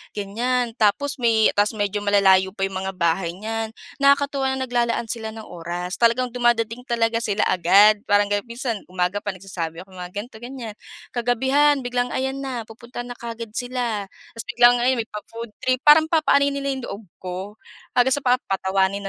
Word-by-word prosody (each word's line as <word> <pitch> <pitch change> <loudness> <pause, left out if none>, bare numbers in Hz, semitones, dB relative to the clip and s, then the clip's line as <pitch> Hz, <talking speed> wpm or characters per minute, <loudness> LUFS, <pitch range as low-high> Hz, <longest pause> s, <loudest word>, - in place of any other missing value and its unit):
ganyan. 235 +4 -1
Tapos 275 +7 +2
may 225 -2 +4
ta's 205 +2 +1
medyo 205 -1 -1
malalayo 195 -2 +3
pa 195 - -3
'yong 195 -1 -2
mga 190 - -5
bahay 170 0 0
niyan. 225 +2 -4 0.2
Nakakatuwa 280 -1 +3
na 265 - -2
naglalaan 235 -2 0
sila 225 -2 -4
ng 220 - -8
oras. 170 -3 -7 0.2
Talagang 235 +2 +2
dumadating 240 0 0
talaga 230 -2 +1
sila 215 -3 -1
agad, 200 +4 +5
parang 205 0 +3
ganun. 205 +1 0
Minsan 235 -2 -4
umaga 180 +2 -1
pa 205 -1 -3
nagsasabi 175 -3 -6
ako 190 - -15
mga 180 0 -7
gan'to, 220 +3 -6
ganyan, 240 -3 -8 0.3
kagabihan 265 +4 +2
biglang 245 0 -2
ayan 265 +1 -2
na, 265 -4 -4
pupunta 235 +3 -9
na 245 0 -8
kaagad 230 -1 -7
sila. 245 -5 -2 0.3
Ta's - - -4
biglang 240 0 +5
ayan 245 0 +2
may 220 - -10
pa-food 230 +2 -8
trip, 255 0 0
parang 300 +2 +7
papa-anuhin 295 -3 +3
nila 280 0 -2
'yong 260 - -7
loob 205 - -7
ko. 180 -1 -6 0.6
Hanggang 255 +2 +5
sa 285 - -1
papatawanin 195 -5 +1
230 Hz, 175 wpm, -22 LUFS, 205-250 Hz, 0.6 s, parang